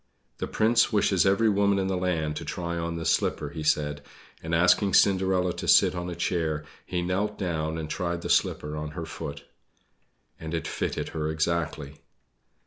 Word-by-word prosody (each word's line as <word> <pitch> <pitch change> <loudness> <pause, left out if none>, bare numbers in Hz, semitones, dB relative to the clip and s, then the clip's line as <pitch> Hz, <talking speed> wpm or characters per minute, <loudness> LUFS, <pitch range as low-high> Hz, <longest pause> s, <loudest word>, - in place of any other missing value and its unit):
"The - - -2
Prince 115 +2 +3
wishes 100 -3 +3
every 100 +4 +3
woman 100 -1 +3
in 95 - 0
the 95 0 -1
land 85 -4 -1
to - - -5
try 85 +2 -4
on 85 0 -3
this 80 - +1
slipper," 75 - 0
he 80 +1 -7
said; 75 -1 0 0.4
and 80 +1 -2
asking 90 +3 +4
Cinderella 95 -2 +3
to - - -5
sit - - +6
on 90 0 -4
a 85 - -5
chair, 80 -4 -1 0.2
he 90 -1 -3
knelt 100 +4 -1
down 80 -4 -2
and 80 -1 -4
tried 85 0 -3
the - - -3
slipper 75 +1 +1
on 75 0 -4
her 85 - -3
foot. 70 -2 -7 1.0
And 80 +1 -4
it 80 - -3
fitted - - -3
her 75 -1 -3
exactly! 80 -2 -2
85 Hz, 180 wpm, -27 LUFS, 80-95 Hz, 1.0 s, sit